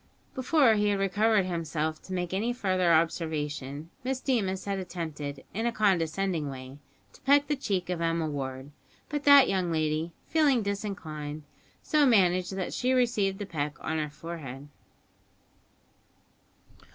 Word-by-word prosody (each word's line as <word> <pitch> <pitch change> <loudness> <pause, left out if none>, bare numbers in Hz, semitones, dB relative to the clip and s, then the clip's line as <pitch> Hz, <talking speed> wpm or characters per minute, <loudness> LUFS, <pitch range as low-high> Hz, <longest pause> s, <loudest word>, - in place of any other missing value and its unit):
Before 260 -2 +4
he 210 -1 +2
had 205 -1 +2
recovered 200 +1 +2
himself 160 -3 -2
to 190 - -8
make 180 -1 -2
any 225 +5 0
further 185 -6 +1
observation, 155 -2 -1
Miss 260 0 -1
Deemas 200 -9 -1
had 200 -1 -2
attempted, 155 -6 -5
in 225 +4 -1
a - - +1
condescending 185 -6 +1
way, 130 +1 -9 0.3
to - - -18
peck 285 +1 +4
the 295 +1 0
cheek 195 -9 -2
of 175 -2 -2
Emma 165 -1 0
Ward; 135 -1 -5 0.4
but 295 -1 -3
that 285 -2 +8
young 185 -3 0
lady, 155 +1 0
feeling 285 -7 +3
disinclined, 160 -7 -4 0.4
so 305 -1 +3
managed 185 -5 +3
that 190 -2 -3
she 255 +1 +1
received 230 -6 +1
the 205 - -5
peck 150 -4 -3
on 160 0 -2
her 150 -1 -2
forehead. 145 -3 -8
180 Hz, 145 wpm, -28 LUFS, 155-215 Hz, 0.4 s, that